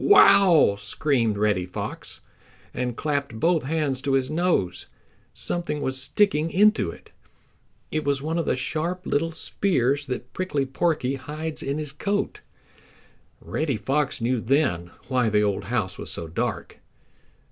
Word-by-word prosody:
"Wow!" 190 Hz, -, +6 dB
screamed 115 Hz, +1 st, 0 dB
Reddy 100 Hz, -4 st, +1 dB
Fox, 90 Hz, -, -6 dB, 0.5 s
and 125 Hz, -2 st, -3 dB
clapped 140 Hz, -6 st, -2 dB
both 165 Hz, +2 st, +3 dB
hands 145 Hz, -3 st, 0 dB
to 140 Hz, -1 st, -1 dB
his 135 Hz, +1 st, +1 dB
nose. 165 Hz, -, 0 dB, 0.4 s
Something 175 Hz, -4 st, -2 dB
was 130 Hz, -2 st, +1 dB
sticking 160 Hz, 0 st, +2 dB
into 210 Hz, +5 st, +3 dB
it. -, -, -12 dB, 0.8 s
It 155 Hz, 0 st, -1 dB
was 140 Hz, -1 st, +1 dB
one 160 Hz, +4 st, -2 dB
of 165 Hz, -, -2 dB
the -, -, +2 dB
sharp 165 Hz, +8 st, -3 dB
little 165 Hz, +3 st, 0 dB
spears 145 Hz, -5 st, 0 dB
that 125 Hz, -1 st, -5 dB
Prickly 150 Hz, -7 st, -1 dB
Porky 135 Hz, -1 st, 0 dB
hides 155 Hz, +4 st, -5 dB
in 140 Hz, +2 st, -2 dB
his 150 Hz, -2 st, -4 dB
coat. 205 Hz, -, -2 dB, 1.0 s
Reddy 150 Hz, -6 st, -2 dB
Fox 140 Hz, +4 st, -1 dB
knew 120 Hz, +1 st, +1 dB
then 115 Hz, -, +1 dB, 0.2 s
why 125 Hz, -3 st, +2 dB
the 105 Hz, 0 st, +3 dB
old 100 Hz, -1 st, -1 dB
house 105 Hz, -4 st, -2 dB
was -, -, -5 dB
so 85 Hz, -, -4 dB
dark. 80 Hz, -, -3 dB
140 Hz, 145 wpm, -25 LUFS, 125-160 Hz, 1.0 s, Wow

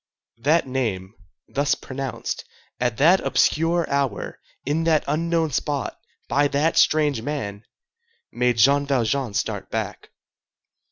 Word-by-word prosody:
That 155 Hz, +8 st, +3 dB
name, 110 Hz, -8 st, -2 dB, 0.3 s
thus 140 Hz, +1 st, +1 dB
pronounced, 135 Hz, 0 st, -5 dB, 0.4 s
at 120 Hz, -3 st, 0 dB
that 170 Hz, +8 st, +5 dB
obscure 165 Hz, +2 st, +2 dB
hour, 140 Hz, -7 st, -2 dB, 0.3 s
in 150 Hz, +4 st, 0 dB
that 160 Hz, -2 st, +3 dB
unknown 165 Hz, +1 st, 0 dB
spot, 140 Hz, +1 st, -2 dB, 0.3 s
by 145 Hz, +4 st, +3 dB
that 145 Hz, +3 st, +1 dB
strange 150 Hz, -6 st, +3 dB
man, 110 Hz, -7 st, -4 dB, 0.7 s
made 125 Hz, -1 st, +1 dB
Jean 140 Hz, +5 st, +4 dB
Valjean 130 Hz, -3 st, 0 dB
start -, -, -2 dB
back. -, -, -4 dB
140 Hz, 115 wpm, -23 LUFS, 125-155 Hz, 0.7 s, that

